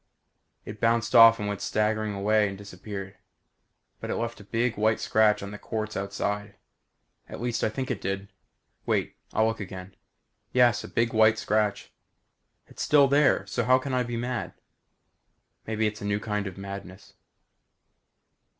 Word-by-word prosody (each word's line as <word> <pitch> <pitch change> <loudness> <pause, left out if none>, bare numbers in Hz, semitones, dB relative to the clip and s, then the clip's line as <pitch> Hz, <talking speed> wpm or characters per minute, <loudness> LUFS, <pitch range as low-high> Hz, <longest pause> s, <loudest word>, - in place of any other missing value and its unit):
It 105 0 -8
bounced 115 +1 +1
off 115 -1 +9
and 105 - -4
went 100 -1 -4
staggering 105 -1 0
away 105 +1 +2
and 95 - -7
disappeared. 100 0 -8 0.8
But - - -6
it - - -1
left 115 -1 -3
a - - -11
big 115 +3 -1
white 110 +1 +1
scratch 105 -1 +2
on 100 - -6
the 105 - -8
quartz 110 -1 -4
outside. 100 +1 -3 0.7
At - - -8
least 120 -1 -2
I - - +2
think 130 +4 -4
it 115 - -4
did. 100 +1 -4 0.5
Wait. - - 0 0.2
I'll 110 - +2
look 110 0 -1
again. 95 -2 -8 0.6
Yes. 125 -3 +4
A - - -7
big 115 0 0
white 110 0 +5
scratch. 105 -1 -1 0.7
It's - - -10
still 145 -2 +5
there. 140 +1 +3
So - - -2
how 130 +1 +5
can 130 +1 -4
I 125 - +2
be 120 -1 -3
mad? 120 0 -3 1.1
Maybe 110 0 0
it's 105 0 -3
a - - -5
new 100 0 0
kind 105 -1 -3
of 95 - -8
madness.... 100 -1 -9
110 Hz, 165 wpm, -27 LUFS, 100-115 Hz, 1.1 s, off